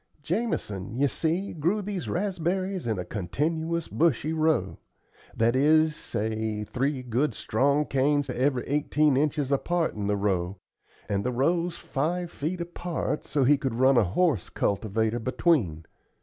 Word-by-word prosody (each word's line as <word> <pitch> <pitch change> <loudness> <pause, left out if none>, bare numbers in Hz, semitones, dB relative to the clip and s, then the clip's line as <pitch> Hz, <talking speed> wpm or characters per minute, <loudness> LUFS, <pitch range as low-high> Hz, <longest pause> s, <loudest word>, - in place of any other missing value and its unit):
Jamison, 130 - -2
you 140 +2 +3
see, 170 +7 -1
grew 170 +7 0
these 200 -3 -4
raspberries 185 -2 -1
in 110 -3 0
a 90 - -4
continuous 160 - -2
bushy 155 -1 +1
row; 160 0 +1 0.6
that 115 +2 +3
is, 155 +3 +4
say, 110 -2 -2
three 130 +4 -2
good 125 +1 0
strong 140 +6 +1
canes 145 +1 +1
every 130 -1 0
eighteen 150 0 +2
inches 145 -1 0
apart 165 +4 +1
in 105 -1 -3
the 105 0 +1
row, 95 -2 -1 0.5
and 100 -1 -1
the 125 - 0
rows 170 +7 0
five 170 +5 -2
feet 170 +5 -3
apart, 170 -2 -3
so 145 - +1
he 140 +2 +4
could 130 -4 -2
run 130 +2 +4
a 120 - +5
horse 115 - +1
cultivator 110 +3 0
between. 110 - +1
140 Hz, 145 wpm, -27 LUFS, 110-165 Hz, 0.6 s, a